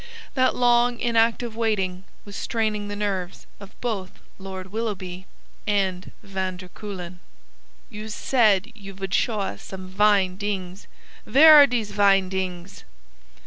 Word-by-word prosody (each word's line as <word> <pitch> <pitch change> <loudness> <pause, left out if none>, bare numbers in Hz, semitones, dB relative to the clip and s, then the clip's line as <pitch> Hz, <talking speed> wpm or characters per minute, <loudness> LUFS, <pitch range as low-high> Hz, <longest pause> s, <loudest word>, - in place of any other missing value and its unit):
That 255 -1 +2
long, 240 0 +3
inactive 230 0 +1
waiting 195 -5 -1 0.2
was 200 -1 -10
straining 215 -2 -2
the 205 - -5
nerves 195 -3 -3
of 200 -1 -14
both 205 -6 -3 0.3
Lord 190 -1 -8
Willoughby 190 -5 -5 0.4
and 190 -3 -1
van 190 -2 -4
der 180 0 -11
Kuylen. 180 -3 -8 0.7
"You 215 0 -7
said 215 -2 +2
you 200 -3 -11
vould 195 -1 -5
show 220 -4 +1
us 195 - -5
zome 185 -1 -8
vine 195 -1 +2
dings. 195 -2 -5 0.4
Vhere 310 +3 +8
are 290 -2 +9
dese 235 -5 -2
vine 195 -2 +3
dings?" 185 -1 -5
200 Hz, 135 wpm, -24 LUFS, 185-225 Hz, 0.7 s, are